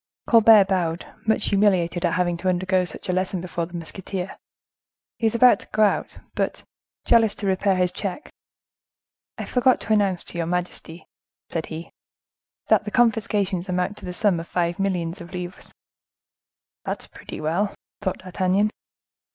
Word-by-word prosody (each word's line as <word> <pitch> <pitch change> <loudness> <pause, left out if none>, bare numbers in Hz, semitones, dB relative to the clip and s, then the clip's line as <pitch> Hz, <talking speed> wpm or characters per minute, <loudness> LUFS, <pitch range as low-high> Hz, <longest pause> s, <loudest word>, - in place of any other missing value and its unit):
Colbert 220 -3 +7
bowed, 175 -3 -1 0.2
much 220 -1 +2
humiliated 185 -4 +2
at 170 - +2
having 175 -1 +1
to 185 +2 -1
undergo 185 0 +1
such 175 - -5
a 185 - 0
lesson 185 0 0
before 170 -1 -3
the 175 - -11
musketeer; 185 +2 -5 0.8
he 225 - +2
was 220 - -1
about 250 +2 +6
to - - -12
go 215 - +2
out, 205 - +1 0.2
but, - - -2 0.4
jealous 225 -3 +4
to 205 - -6
repair 195 0 +2
his 180 -1 +1
check: 195 +8 -4 1.1
"I - - -4
forgot 250 0 +3
to 220 - 0
announce 200 -4 +2
to 170 - -6
your 165 - -1
majesty," 175 -1 -4 0.4
said 165 -1 -3
he, 160 +1 -7 0.8
"that - - +4
the - - -4
confiscations 205 -5 +1
amount 180 +3 -1
to - - -10
the 180 - -4
sum 195 -3 +2
of 165 - -7
five 175 0 -1
millions 180 -2 -1
of 175 +2 -11
livres." 180 0 -7 1.1
"That's - - -3
pretty - - -10
well!" 175 +7 -1 0.3
thought 190 -3 -1
D'Artagnan. 185 +3 +1
185 Hz, 160 wpm, -24 LUFS, 175-205 Hz, 1.1 s, Colbert